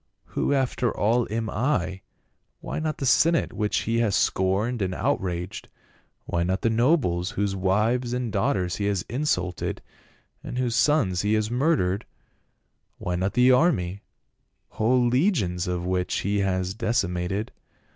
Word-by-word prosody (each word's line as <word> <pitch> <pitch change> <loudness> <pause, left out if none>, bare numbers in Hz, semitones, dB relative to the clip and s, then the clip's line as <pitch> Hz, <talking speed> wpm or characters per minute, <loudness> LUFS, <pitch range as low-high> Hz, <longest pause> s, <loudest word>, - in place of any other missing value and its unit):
Who - - 0
after 130 -3 +1
all 115 +3 +1
am 110 +1 -2
I? 100 -7 -1 0.6
Why - - -4
not 155 -1 -2
the 135 - -3
senate, 165 +5 +3
which 105 -1 0
he 115 +1 0
has 110 -4 +2
scorned 100 +6 +1
and 95 -1 -1
out 140 +9 0
raged? 90 +1 -4 0.6
Why 85 - -1
not 95 +2 0
the 115 - +1
nobles, 110 - +2
whose 100 -3 -1
wives 110 +6 +1
and 125 -3 -2
daugh 115 +8 +2
ters 90 -2 -2
he 100 - -2
has 100 -3 0
insulted, 95 - -2 0.6
and - - -6
whose 125 -2 0
sons 120 - +2
he 105 +1 +1
has 110 +1 -1
murdered? 120 - +1 0.9
Why 90 - -3
not 95 +3 -1
the 125 +1 +5
army, 100 - +2 0.7
whole 120 +3 +2
legions 120 - +1
of 90 -1 -2
which 90 0 -1
he 100 +1 0
has 95 -1 0
deci 115 -1 0
mated? 90 +4 -3
105 Hz, 155 wpm, -25 LUFS, 95-125 Hz, 0.9 s, the